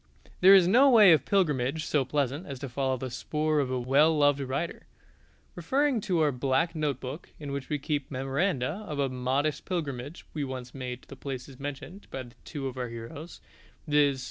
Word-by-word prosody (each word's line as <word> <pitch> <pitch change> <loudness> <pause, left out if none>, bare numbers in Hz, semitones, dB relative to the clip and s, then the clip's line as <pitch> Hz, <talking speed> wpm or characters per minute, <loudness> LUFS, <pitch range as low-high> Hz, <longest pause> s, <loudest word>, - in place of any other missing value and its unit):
There 190 +2 +9
is 185 -3 +6
no 255 +9 +6
way 215 -7 +8
of 155 - +2
pilgrimage 155 -6 +1
so 145 -3 +1
pleasant 140 +4 -2
as 140 -2 -6
to 135 +1 -6
follow 130 +1 -1
the 130 0 -5
spoor 150 +5 -1
of 135 -3 0
a 130 -1 -1
well 145 +6 +3
loved 145 -1 +4
writer. 140 +5 -4 0.7
Referring 260 - +1
to 185 -6 0
our 150 -2 +3
black 135 +6 0
note 150 -5 -1
book, 130 +6 -7
in 145 -2 -6
which 140 -1 -5
we 150 - 0
keep 145 0 -3
memoranda 140 - -1
of 150 - -4
a 140 -1 +1
modest 130 +4 -1
pilgrimage 145 -4 -4
we 150 - -2
once 130 -2 -6
made 125 -2 -6
to 135 - -11
places 135 -1 -7
mentioned 145 +8 -7
by 130 -2 -6 0.2
two 145 -3 -5
of 130 -1 -4
our 125 -1 -3
heroes, 130 +8 -9 0.5
viz. 145 -2 +3
140 Hz, 190 wpm, -28 LUFS, 130-160 Hz, 0.7 s, There